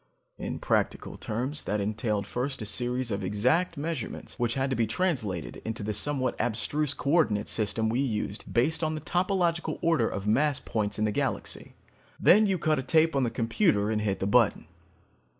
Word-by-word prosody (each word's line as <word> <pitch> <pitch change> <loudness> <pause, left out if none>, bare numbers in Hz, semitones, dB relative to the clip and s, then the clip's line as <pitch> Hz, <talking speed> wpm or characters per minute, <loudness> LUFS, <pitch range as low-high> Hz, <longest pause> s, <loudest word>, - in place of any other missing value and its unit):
In - - -4
practical - - -1
terms, 130 +7 -3
that 105 +1 -1
entailed 105 0 -1
first 125 +6 -2
a - - -5
series 125 +2 0
of 100 0 -2
exact 125 - +1
measurements 150 -4 -4
which 120 -1 0
had 135 0 0
to - - +1
be 115 -1 +1
translated 110 - -2
into 110 -1 -4
the 105 +1 -2
somewhat 130 +3 0
abstruse 140 +5 0
co 140 - -2
ordinate 110 -11 +2
system 110 +1 +1
we 115 +3 0
used 110 -5 -2
based 150 +8 +1
on 155 0 0
the 155 - -5
topological 175 +1 0
order 165 -9 +3
of 100 0 -5
mass 140 +6 +2
points 105 -2 -2
in 110 - +1
the 105 - +1
galaxy. - - -3 0.4
Then 210 +3 +6
you 190 -2 +1
cut 155 -2 +1
a - - 0
tape 160 +4 +3
on 135 - +2
the - - 0
computer 115 - +1
and 105 -1 0
hit 100 -2 -1
the - - -1
button. 110 +1 +3
120 Hz, 185 wpm, -28 LUFS, 105-155 Hz, 0.4 s, Then